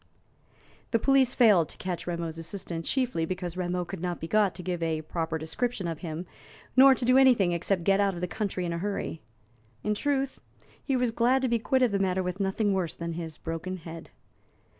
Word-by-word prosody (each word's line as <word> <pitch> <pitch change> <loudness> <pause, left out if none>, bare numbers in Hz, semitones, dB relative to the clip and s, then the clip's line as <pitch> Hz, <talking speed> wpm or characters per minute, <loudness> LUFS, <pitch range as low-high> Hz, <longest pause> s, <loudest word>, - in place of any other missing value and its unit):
The 230 - +3
police 265 +1 +3
failed 205 - +5
to - - -10
catch 180 -2 -4
Rameau's 170 -2 -3
assailant 165 -1 -5
chiefly 250 -11 0
because 180 0 -3
Rameau 180 -1 -2
could - - -7
not 175 -2 -2
be 165 - -5
got 210 0 +2
to 180 - -7
give 175 -1 -3
a 160 -1 -1
proper 160 0 -2
description 190 +6 -2
of 165 -2 -4
him, 165 0 -5 0.5
nor 265 +1 +8
to 240 - -2
do 255 +2 +6
anything 245 -9 +5
except 175 +1 0
get 195 +2 +3
out 200 -2 +2
of 170 - -6
the 180 - -1
country 190 -2 -3
in 170 - -2
a 170 - -3
hurry. 195 -4 -3 0.6
In 210 - +1
truth, 275 +3 -1 0.4
he 270 - 0
was 250 -2 +1
glad 245 +3 +2
to - - +3
be 235 -1 +1
quit 260 +3 +2
of 245 - +3
the 200 - 0
matter 190 -1 +1
with 180 +2 -4
nothing 200 +1 +1
worse 180 -4 -1
than 170 0 -4
his 160 -2 -6
broken 165 +3 -4
head. 165 -1 -9
185 Hz, 210 wpm, -28 LUFS, 170-230 Hz, 0.6 s, nor